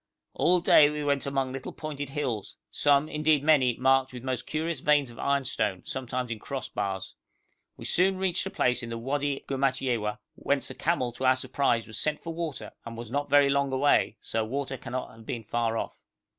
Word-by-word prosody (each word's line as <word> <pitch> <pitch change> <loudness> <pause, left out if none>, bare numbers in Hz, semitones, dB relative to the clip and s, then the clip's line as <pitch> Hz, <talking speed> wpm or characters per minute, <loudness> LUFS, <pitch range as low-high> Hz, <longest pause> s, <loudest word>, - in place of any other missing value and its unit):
All 180 0 +3
day 150 -3 +7
we 150 0 -3
went 140 -1 0
among 135 -1 -1
little 135 0 -6
pointed 145 -3 -5
hills, 130 -8 -3
some, 145 0 +3
indeed 150 -1 +2
many, 135 -6 +4
marked 130 0 +3
with 125 -1 -8
most 130 -1 -3
curious 160 +2 -2
veins 145 -4 +3
of 115 - -14
ironstone, 125 -9 0
sometimes 125 -1 -3
in 110 - -4
cross 135 +4 -4
bars. 95 -1 -3 0.6
We - - -9
soon 190 +2 +3
reached 190 -1 +1
a - - -3
place 125 -7 +1
in 115 - -6
the 115 - -4
Wadi 140 +3 -1
Gumatyewa, 130 -5 0 0.2
whence 140 -1 -1
a - - -5
camel 155 -7 0
to 120 +3 -4
our 130 0 +6
surprise 130 -2 0
was 110 - -5
sent 150 0 0
for 165 - -6
water, 165 -4 -4
and 115 0 -8
was 120 -1 -7
not 145 +2 -1
very 140 -1 +5
long 140 -1 +1
away, 130 -3 +3
so 110 - -1
water 135 +4 -3
cannot 125 0 -5
have 115 0 -15
been 115 -2 -4
far 115 +1 -1
off. - - -5
135 Hz, 200 wpm, -28 LUFS, 120-145 Hz, 0.6 s, day